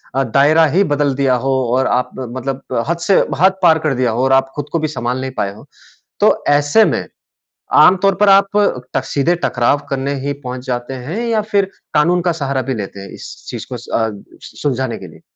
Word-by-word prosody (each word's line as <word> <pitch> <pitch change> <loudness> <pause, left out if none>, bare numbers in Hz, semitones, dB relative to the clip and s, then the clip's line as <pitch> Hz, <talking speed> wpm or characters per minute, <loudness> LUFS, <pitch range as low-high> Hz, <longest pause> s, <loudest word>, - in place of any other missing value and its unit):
अ, 135 - +2
दायरा 145 +7 +4
ही 200 - +5
बदल 145 -1 +1
दिया 130 -2 +2
हो 135 - +2 0.2
और 130 0 +2
आप 125 +1 0
मतलब 130 +2 -5
अ, 115 - 0
हद 170 - 0
से 195 - +5 0.2
हद 190 +1 +4
पार 160 -2 +5
कर 135 - +1
दिया 125 -2 +1
हो 120 +3 -1
और 135 0 +3
आप 135 0 +3
खुद 145 0 -5
को 165 - 0
भी 155 - -1
सँभाल 125 -3 -3
नहीं 130 0 -4
पाएँ 100 0 -1
हो 110 - -14 0.6
तो - - +5
ऐसे 145 +9 +4
में - - -1 0.7
आम 185 - +7
तौर 195 -1 +3
पर 205 -1 +3
आप 195 0 +6 0.5
ट 135 - +2
सीधे 145 +5 +1
टकराव 120 +4 +1
करने 135 0 -2
ही 145 - -1
पहुँच 125 0 -6
जाते 125 0 -3
हैं 180 +10 -4
या 225 -2 +1
फिर 205 -2 +1 0.3
कानून 170 +4 +3
का 175 0 +1
सहारा 140 -4 -2
भी 130 +2 -3
लेते 100 -2 -6
हैं 100 -1 -9
इस - - -9 0.2
चीज़ - - -6
को - - -3
अ, - - -10 0.5
सु - - -13
सुलझाने 130 -4 -2
के - - -10
लिए? - - -16
140 Hz, 225 wpm, -17 LUFS, 130-165 Hz, 0.7 s, आम